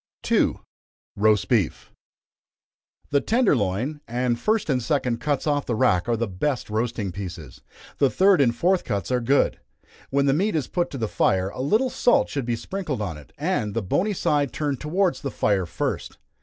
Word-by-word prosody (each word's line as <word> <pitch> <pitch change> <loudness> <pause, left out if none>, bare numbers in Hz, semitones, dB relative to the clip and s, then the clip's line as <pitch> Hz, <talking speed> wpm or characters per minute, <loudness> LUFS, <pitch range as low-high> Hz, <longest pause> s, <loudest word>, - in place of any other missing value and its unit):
2. - - +2 0.6
Roast 105 -2 +3
Beef. - - 0 1.2
The 140 -1 +3
tender 230 - +3
loin 120 +8 -2
and 120 0 -1
first 215 -1 +1
and 130 -4 +1
second 125 -3 0
cuts 145 -2 -1
off 145 -2 0
the 120 - 0
rack 115 -5 +2
are 115 - +2
the 115 +1 -1
best 110 +6 -2
roasting 110 -3 -1
pieces 90 -2 -8 0.4
the 140 - +4
third 190 -1 +4
and 120 -3 +3
fourth 180 +6 +2
cuts 100 +1 -3
are 125 -1 +1
good. 135 +4 +2 0.5
When 140 +1 +2
the 135 - +3
meat 195 +7 +1
is 150 - 0
put 175 -1 -1
to 140 - -6
the 115 -3 -1
fire, 95 -2 +1
a 125 - -6
little 220 - +2
salt 245 - +3
should 140 -4 -3
be 120 - +1
sprinkled 155 - -4
on 95 -6 -3
it, 75 -1 -14
and 145 - -1
the 115 - -1
bony 195 - 0
side 145 -6 +1
turned 145 -5 -2
towards 180 +4 0
the 140 - -3
fire 100 -7 0
first. - - -3
130 Hz, 185 wpm, -24 LUFS, 110-150 Hz, 1.2 s, the